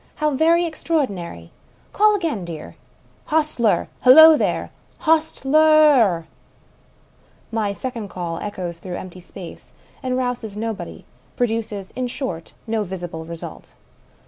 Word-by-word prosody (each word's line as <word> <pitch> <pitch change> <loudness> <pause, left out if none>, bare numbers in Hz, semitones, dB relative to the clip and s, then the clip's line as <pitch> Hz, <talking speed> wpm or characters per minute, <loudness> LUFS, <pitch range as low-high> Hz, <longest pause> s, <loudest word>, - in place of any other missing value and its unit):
How 305 -1 0
very 330 +5 +3
extraordinary 205 - -3 0.4
I - - -17
Call 425 0 +5
again, 325 - -2
dear." 165 -3 -8 0.5
"Hostler! 300 -8 +1 0.2
Hullo, 315 +5 +9
there! - - -1 0.3
Hostler 310 -2 +2
r 310 -3 +6
r! 170 -5 -1 0.6
" - - -34
My 205 -1 0
second 230 0 -5
call 170 -2 -4
echoes 180 -5 -5
through 175 0 -6
empty 185 0 -9
space, 180 0 -11 0.3
and 255 -2 -1
rouses 240 -5 -3
nobody 225 -1 -5 0.2
— - - -34
produces, 220 -5 -2
in 255 -1 -2
short, 185 - -5
no 225 -1 -1
visible 175 -4 -6
result. 170 0 -9
225 Hz, 130 wpm, -21 LUFS, 180-305 Hz, 0.6 s, Hullo